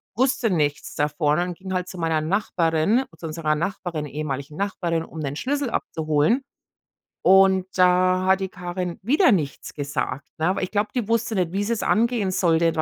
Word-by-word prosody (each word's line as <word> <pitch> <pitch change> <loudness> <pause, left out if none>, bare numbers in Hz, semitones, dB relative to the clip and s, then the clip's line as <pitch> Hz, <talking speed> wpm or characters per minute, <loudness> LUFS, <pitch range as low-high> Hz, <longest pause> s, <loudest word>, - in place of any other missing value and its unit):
wusste 255 -1 +2
nichts 150 -4 -1
davon 150 +1 +1
und 175 -1 -2
ging 190 0 -6
halt 180 0 -1
zu 185 - -9
meiner 165 -2 0
Nachbarin, 180 +5 +1
zu - - -9
unserer 155 -1 -1
Nachbarin, 170 -2 -3
ehemaligen 145 0 -5
Nachbarin, 175 -4 -1
um 160 - -10
den 140 -1 -3
Schlüssel 280 - -1
abzuholen. 155 - 0 0.8
Und 190 0 +5
da 185 0 +4
hat 190 0 +4
die 190 - -2
Karin 180 -2 -5
wieder 295 - +4
nichts 150 -8 -1
gesagt, 140 -1 -3
ne? 170 +4 +1
Ich 185 - -2
glaube, 210 0 0
die 230 -4 -1
wusste 230 0 0
nicht, 180 -2 0
wie 200 +1 0
sie 230 +3 0
es 225 - -3
angehen 225 -3 +2
sollte. 170 -2 +2
180 Hz, 175 wpm, -23 LUFS, 155-200 Hz, 0.8 s, Und